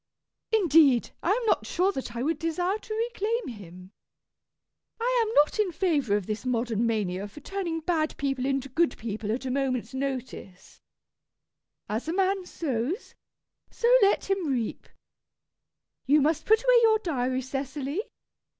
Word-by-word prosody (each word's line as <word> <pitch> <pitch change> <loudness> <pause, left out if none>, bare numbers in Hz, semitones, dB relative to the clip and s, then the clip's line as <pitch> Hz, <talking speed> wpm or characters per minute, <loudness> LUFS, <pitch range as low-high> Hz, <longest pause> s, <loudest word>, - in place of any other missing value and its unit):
Indeed 320 - +4
I - - -1
am 460 +4 +1
not 435 - +1
sure 370 +2 +1
that 260 -7 -6
I 235 - -2
would 315 +2 -1
desire 355 +5 -1
to 445 +2 -3
reclaim 460 - -2
him. 185 -4 -11 1.1
I 485 0 +2
am 440 - -3
not 295 +8 +4
in 410 -4 +2
favour 300 - +1
of 205 -3 -1
this 215 +2 -4
modern 235 -2 0
mania 200 -3 -1
for 205 +8 -12
turning 340 0 -3
bad 315 -1 -1
people 270 -2 -1
into 275 -1 -1
good 325 +6 +1
people 215 -1 -4
at 255 +4 -3
a 255 - -2
moment's 255 -3 -1
notice. 260 -8 -6 1.1
As 220 +7 -3
a 325 - -1
man 380 0 0
sows 290 - -3 0.6
so 475 +1 +2
let 400 0 +3
him 390 -4 0
reap. 245 -5 -2 1.2
You 295 +3 +5
must 300 +2 +1
put 440 +2 +4
away - - +6
your 445 -1 +5
diary, 260 - -1
Cecily. 275 +5 -3
285 Hz, 150 wpm, -27 LUFS, 245-385 Hz, 1.2 s, away